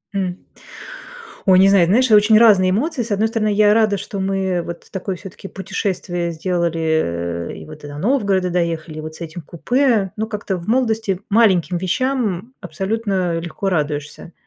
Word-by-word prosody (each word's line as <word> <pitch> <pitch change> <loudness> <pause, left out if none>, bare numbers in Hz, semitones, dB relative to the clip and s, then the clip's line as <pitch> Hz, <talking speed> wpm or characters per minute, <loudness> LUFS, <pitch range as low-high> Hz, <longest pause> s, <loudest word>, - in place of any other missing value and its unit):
М. 185 -2 -2 1.1
Ой, 185 -1 +6
не 195 +1 +6
знаю, 190 -4 +5
знаешь, 240 +6 +3
и - - +7
очень 210 +1 +6
разные 200 -5 +5
эмоции. 250 - -1
С 230 - -7
одной 210 +2 +1
стороны, 220 -2 0
я 210 0 +4
рада, 215 -3 +2
что 200 - -6
мы, 195 0 -1
э, 185 -2 -1
вот 170 0 -8
такое 190 0 -4
всё-таки 195 +1 -10
путешествие 175 -3 -3
сделали, 170 0 -1 0.7
э, - - -5
и - - -10
вот 155 -1 -12
и - - -7
до 145 0 -8
Новгорода 200 - +1
доехали, 165 -3 -2
и - - -4
вот 155 0 -7
с 160 - -13
этим 165 +1 -7
купе. 225 - 0
Но 220 - -2
как-то 205 -3 -3
в 170 - -9
молодости 220 -5 0
маленьким 190 -6 +3
вещам 230 +3 -1
абсолютно 190 0 -2
легко 170 +4 -4
радуешься. 150 0 -3
190 Hz, 180 wpm, -19 LUFS, 170-215 Hz, 1.1 s, и